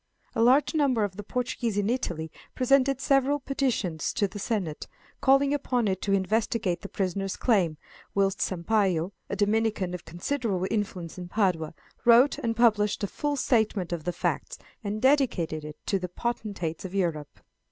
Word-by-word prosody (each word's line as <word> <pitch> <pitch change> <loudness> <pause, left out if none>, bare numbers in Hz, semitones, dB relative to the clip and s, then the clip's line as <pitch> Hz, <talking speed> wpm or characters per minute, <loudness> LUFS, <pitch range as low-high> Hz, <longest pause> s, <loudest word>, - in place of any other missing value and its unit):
A 225 - 0
large 260 +7 +4
number 275 -8 +2
of 200 -2 -2
the 210 - -6
Portuguese 235 -1 -2
in 205 -1 +1
Italy 175 -10 -2 0.2
presented 275 +1 +3
several 275 +1 +2
petitions 250 - -1
to 205 - +1
the 205 +2 -8
Senate, 195 -8 -2 0.3
calling 275 +1 +4
upon 250 -5 0
it 190 -1 -1
to 200 - -1
investigate 195 -1 0
the 200 - -8
prisoner's 195 0 -2
claims, 185 -10 +2 0.4
whilst 195 -1 +1
Sampayo, 185 -1 +1 0.2
a - - -2
Dominican 205 -2 +1
of 180 - -6
considerable 190 - -2
influence 185 -5 -3
in 180 - -6
Padua, 175 -6 0 0.3
wrote 240 +4 +6
and 230 -1 -1
published 215 -3 +3
a - - +3
full 290 +8 -2
statement 220 -9 +1
of 165 -3 -4
the 175 - 0
facts, - - -2 0.3
and 210 +2 -3
dedicated 240 - +2
it 150 0 -8
to 195 - +1
the 180 -1 -4
potentates 200 -6 -3
of 190 0 -6
Europe. 165 -6 -2
205 Hz, 165 wpm, -27 LUFS, 180-245 Hz, 0.4 s, wrote